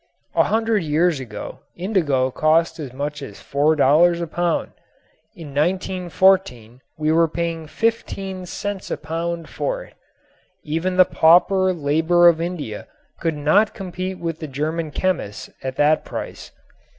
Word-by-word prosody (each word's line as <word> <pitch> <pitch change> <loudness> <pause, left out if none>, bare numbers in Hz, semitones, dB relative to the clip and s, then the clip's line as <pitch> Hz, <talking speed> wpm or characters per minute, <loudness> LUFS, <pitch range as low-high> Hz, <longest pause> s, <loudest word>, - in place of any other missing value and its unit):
A - - +3
hundred 225 -1 +1
years 160 0 +1
ago 115 -5 -8 0.2
indigo 155 -9 0
cost 160 +3 +2
as 140 -5 -6
much 145 +3 -4
as 135 - -8
$4 155 +4 +3
a 170 - -2
pound. 175 +1 -1 0.6
In 165 -5 -9
1914 180 - +1 0.2
we 155 0 +1
were 165 +1 +4
paying 165 0 -3
fifteen 195 -3 -2
cents 205 +1 -5
a - - -2
pound 165 +1 -4
for - - -3
it. - - -17 0.7
Even 165 +4 -2
the 185 - +8
pauper 185 +4 +4
labor 165 +2 +3
of 165 -1 +4
India 165 -11 -5 0.3
could 165 -2 -1
not 175 +9 +3
compete 185 -1 -5
with 165 -2 -4
the 155 - -5
German 155 +4 -3
chemists 150 - -2
at 130 -1 -4
that 150 +2 +3
price. - - -7
165 Hz, 140 wpm, -21 LUFS, 150-185 Hz, 0.7 s, the